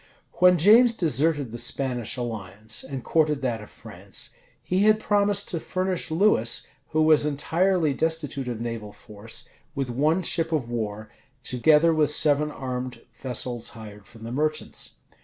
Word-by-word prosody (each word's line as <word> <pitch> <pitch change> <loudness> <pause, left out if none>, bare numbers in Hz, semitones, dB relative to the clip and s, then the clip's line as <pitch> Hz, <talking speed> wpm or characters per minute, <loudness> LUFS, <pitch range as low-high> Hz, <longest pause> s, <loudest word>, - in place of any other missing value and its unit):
When 180 0 +6
James 230 +7 +6
deserted 150 - +1
the 120 - -5
Spanish 125 -1 -1
alliance, 110 -2 -5
and 130 -1 -6
courted 150 -3 +1
that 120 -4 -1
of 105 - -12
France, - - -6 0.3
he 185 - -1
had 215 0 +5
promised 205 -1 +2
to 170 - -1
furnish 185 0 -2
Lewis, 160 - +2 0.2
who 155 0 +1
was 155 -1 +5
entirely 160 +3 +1
destitute 150 -3 -2
of 120 -3 -4
naval 115 -3 -5
force, 105 +2 -7 0.3
with 135 -3 -2
one 155 +8 +1
ship 165 0 +1
of 150 -7 -1
war, 110 -2 -5 0.3
together 155 +7 +3
with 155 -2 +2
seven 150 0 +3
armed 130 -3 -5
vessels 125 -2 -2
hired 105 -2 -11
from 115 -1 -15
the 115 - -6
merchants. 155 +4 -2
140 Hz, 150 wpm, -25 LUFS, 120-165 Hz, 0.3 s, When